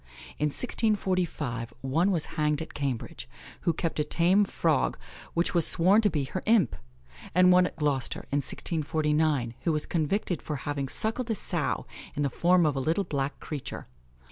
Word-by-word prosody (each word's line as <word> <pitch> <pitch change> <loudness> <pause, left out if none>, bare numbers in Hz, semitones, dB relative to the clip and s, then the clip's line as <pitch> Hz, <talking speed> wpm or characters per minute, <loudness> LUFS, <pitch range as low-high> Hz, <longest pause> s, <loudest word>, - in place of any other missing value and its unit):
In 150 - +2
1645 175 - -1
one 160 +8 +1
was 170 -6 +2
hanged 150 0 0
at - - -12
Cambridge, 135 -5 -4 0.3
who 170 - +2
kept 160 0 -2
a - - +3
tame 185 +7 +3
frog - - 0 0.4
which 170 +1 +1
was 170 -3 +5
sworn 185 +5 +5
to 210 - +3
be 150 -6 -1
her 175 +8 -4
imp; 215 - +4 0.6
and 180 0 +6
one 180 0 +5
at - - -10
Gloucester, 145 -4 -1
in 140 - +1
1649, 150 -3 0
who 170 - +1
was 150 -1 -1
convicted 175 +2 -1
for 150 - -4
having 140 0 -3
suckled 225 - 0
a 225 - +1
sow - - -2 0.3
in 145 - 0
the 140 - 0
form 175 +4 +3
of 150 -2 +1
a - - -1
little 160 +8 +1
black 140 -5 -3
creature. 145 -4 -6
160 Hz, 170 wpm, -28 LUFS, 145-180 Hz, 0.6 s, and